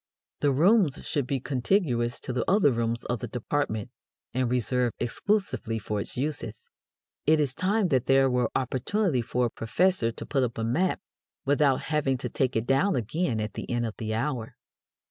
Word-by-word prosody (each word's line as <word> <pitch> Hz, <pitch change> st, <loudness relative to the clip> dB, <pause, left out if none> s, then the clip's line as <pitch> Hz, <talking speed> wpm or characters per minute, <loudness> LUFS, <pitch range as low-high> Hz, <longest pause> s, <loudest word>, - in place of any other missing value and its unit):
The 145 Hz, -, +3 dB
rooms 165 Hz, -, +4 dB
should 140 Hz, -5 st, -1 dB
be 135 Hz, 0 st, 0 dB
contiguous 125 Hz, -, 0 dB
to 130 Hz, -, -4 dB
the 125 Hz, -2 st, 0 dB
other 190 Hz, -7 st, +5 dB
rooms 115 Hz, 0 st, -1 dB
of 120 Hz, -1 st, -2 dB
the -, -, -4 dB
department 120 Hz, -4 st, -2 dB, 0.4 s
and 130 Hz, -1 st, 0 dB
reserved 125 Hz, 0 st, 0 dB
exclusively 130 Hz, -, -1 dB
for 105 Hz, -1 st, -3 dB
its -, -, -4 dB
uses. 125 Hz, -5 st, -4 dB, 0.6 s
It 155 Hz, 0 st, +5 dB
is 140 Hz, -4 st, +1 dB
time 195 Hz, +4 st, +1 dB
that 130 Hz, -5 st, +1 dB
there 135 Hz, 0 st, +5 dB
were 125 Hz, -3 st, +1 dB
opportunity 135 Hz, -, 0 dB
for 125 Hz, +2 st, 0 dB
a -, -, 0 dB
professor 125 Hz, +1 st, +1 dB
to -, -, -7 dB
put 135 Hz, -, 0 dB
up 120 Hz, -2 st, -1 dB
a 115 Hz, -, -2 dB
map 170 Hz, +13 st, +1 dB, 0.4 s
without 140 Hz, -1 st, +3 dB
having 145 Hz, -4 st, 0 dB
to -, -, -4 dB
take 130 Hz, -1 st, 0 dB
it 110 Hz, +1 st, 0 dB
down 135 Hz, +10 st, +2 dB
again 125 Hz, -, -1 dB
at 105 Hz, 0 st, -3 dB
the -, -, -6 dB
end 120 Hz, -1 st, 0 dB
of 110 Hz, -, -4 dB
the 110 Hz, -1 st, -3 dB
hour. 120 Hz, -2 st, -3 dB
130 Hz, 185 wpm, -27 LUFS, 120-150 Hz, 0.6 s, other